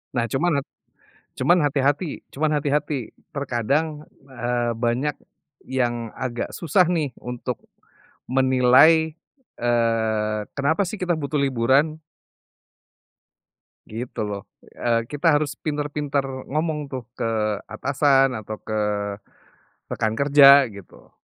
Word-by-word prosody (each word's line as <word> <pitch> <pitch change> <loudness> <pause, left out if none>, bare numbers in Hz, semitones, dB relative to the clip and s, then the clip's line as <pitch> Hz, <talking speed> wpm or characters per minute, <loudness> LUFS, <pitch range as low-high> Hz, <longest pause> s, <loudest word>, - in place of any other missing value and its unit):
Nah 120 -1 +1
cuman 145 +3 +1 0.8
cuman 175 +1 +4
hati-hati 145 +3 0
cuman 155 +2 0
hati-hati. 145 -3 -1 0.2
Terkadang, 140 +4 -1 0.2
eee, 120 -2 -1
banyak 120 +5 0 0.5
yang 120 -3 -1
agak 120 -2 -3
susah 175 +3 +2
nih, 155 -7 -1
untuk, 125 0 -5 0.7
menilai, 135 +5 +5 0.4
eee, 110 -3 +1
kenapa 160 +7 +1
sih 210 +3 -6
kita 175 -2 0
butuh 145 0 -2
liburan? 135 +4 +2 1.9
Gitu 115 +3 -7
loh. 100 -1 -4 0.3
Eee, 115 -1 0
kita 145 +2 -1
harus 145 -3 -3
pintar-pintar 145 -2 -2 0.3
ngomong 155 +1 -1
tuh 130 -2 -4
ke - - -3 0.4
atasan, 135 -2 +2
atau 110 0 -6
ke 105 -1 0 1.0
rekan 110 0 -1
kerja 140 -2 +7
gitu. 100 -3 -15
135 Hz, 100 wpm, -23 LUFS, 120-150 Hz, 1.9 s, kerja